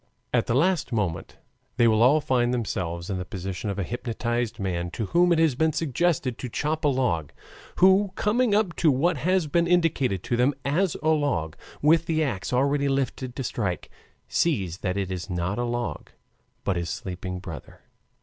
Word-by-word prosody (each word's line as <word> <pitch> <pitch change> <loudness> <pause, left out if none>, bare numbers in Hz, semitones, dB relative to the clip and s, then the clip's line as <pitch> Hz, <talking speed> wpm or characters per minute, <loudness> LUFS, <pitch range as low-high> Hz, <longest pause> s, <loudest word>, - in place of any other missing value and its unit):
At - - +2
the 115 - +1
last 170 +2 +2
moment 105 -8 -2 0.4
they 120 - +5
will 110 -1 +3
all 135 +6 +6
find 125 -3 +1
themselves 90 -7 -3
in 95 - -2
the - - -3
position 95 +1 -5
of 100 - -3
a 100 - -1
hypnotized 120 +2 -3
man 90 -3 -2
to 110 +5 -4
whom 175 - +3
it 170 - +4
has 160 -3 +3
been 160 +5 +1
suggested 145 -4 0
to 125 - -5
chop 155 +6 -2
a - - +4
log, 90 - 0 0.4
who 190 +1 +5
coming 225 0 +2
up 205 -5 +1
to 160 - +4
what 150 +5 +2
has 185 +4 +1
been 170 +3 +1
indicated 150 - +1
to 120 - -1
him 130 +3 +2
as 165 +5 +1
a 155 - +2
log, 115 - 0 0.3
with 165 +3 +4
the 160 -2 +1
ax 115 -10 -3
already 140 +3 +2
lifted 130 -2 -2
to 135 - -3
strike, 100 -7 -3 0.4
sees 95 - 0
that 95 -1 -2
it 95 -2 -2
is 90 0 -5
not 90 +4 -2
a - - 0
log 120 0 -3 0.5
but 95 - 0
his 85 -1 -3
sleeping 90 0 -5
brother. 85 -7 -9
125 Hz, 190 wpm, -25 LUFS, 95-155 Hz, 0.5 s, all